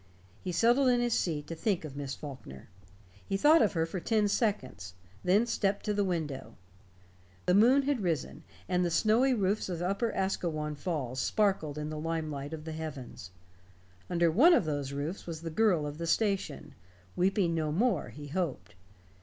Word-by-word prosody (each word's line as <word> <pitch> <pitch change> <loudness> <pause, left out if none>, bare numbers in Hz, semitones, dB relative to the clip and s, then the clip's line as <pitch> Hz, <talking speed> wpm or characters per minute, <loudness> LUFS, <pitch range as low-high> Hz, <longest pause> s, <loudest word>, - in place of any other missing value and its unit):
He 185 - -3
settled 240 +9 +3
in 245 -1 +4
his 240 -1 +1
seat 155 -8 -1
to - - -6
think 175 0 -1
of 140 -3 -8
Miss 140 -1 -4
Faulkner. 130 - -10 0.5
He 195 - -2
thought 305 +9 +6
of 215 - +3
her 165 -2 +1
for 185 +3 -5
ten 215 +2 +1
seconds; 130 - -2 0.3
then 200 +6 +4
stepped 200 -4 -1
to 210 - 0
the 205 0 +1
window. 150 - -3 0.9
The 180 - +3
moon 245 +8 +5
had 275 -4 0
risen, 170 -5 -2 0.3
and 180 -1 +1
the 175 - +1
snowy 225 +9 +3
roofs 200 -1 0
of 175 -2 -3
Upper 200 +6 0
Asquewan 160 -5 -2
Falls 145 -5 -3
sparkled 190 -9 0
in 150 0 -4
the 155 - -4
lime 160 -1 -2
light 140 0 -5
of 160 -1 -7
the 160 - -5
heavens. 150 - -7 0.8
Under 170 -2 +2
one 315 - +6
of 195 - +2
those 145 -3 -2
roofs 145 +8 -4
was 165 -2 -5
the 165 - -4
girl 180 -5 +2
of 145 +1 -6
the 170 - -3
station 195 -6 -1 0.4
weeping 185 -1 +2
no 155 -2 -1
more, 225 +10 +1
he 145 0 -10
hoped. 135 - -3
170 Hz, 180 wpm, -30 LUFS, 150-205 Hz, 0.9 s, thought